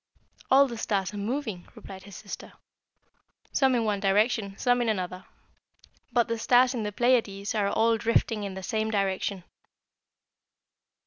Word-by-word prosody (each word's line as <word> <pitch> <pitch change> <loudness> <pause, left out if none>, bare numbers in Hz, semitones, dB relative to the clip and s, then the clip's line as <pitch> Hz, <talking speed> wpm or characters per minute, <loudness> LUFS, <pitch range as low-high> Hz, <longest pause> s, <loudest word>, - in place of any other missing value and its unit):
"All 275 +1 +6
the 235 -3 -7
stars 195 -3 -1
are - - -6
moving," 215 -3 -3
replied 190 -4 -11
his 200 -2 -11
sister. 200 - -9 1.0
"Some 265 -2 +3
in 230 -2 +1
one 210 -2 0
direction, 200 0 +1
some 245 0 +2
in 235 - 0
another; 185 -3 -3 0.9
but 240 -1 +2
the 230 -1 -2
stars 250 +2 +4
in 240 - -3
the 210 -1 -3
Pleiades 220 -4 +1
are 210 -2 +1
all 225 +1 +2
drifting 225 -1 +1
in 195 -2 -5
the 190 - -7
same 220 +1 -1
direction. 195 -2 -1
215 Hz, 150 wpm, -27 LUFS, 195-240 Hz, 1.0 s, All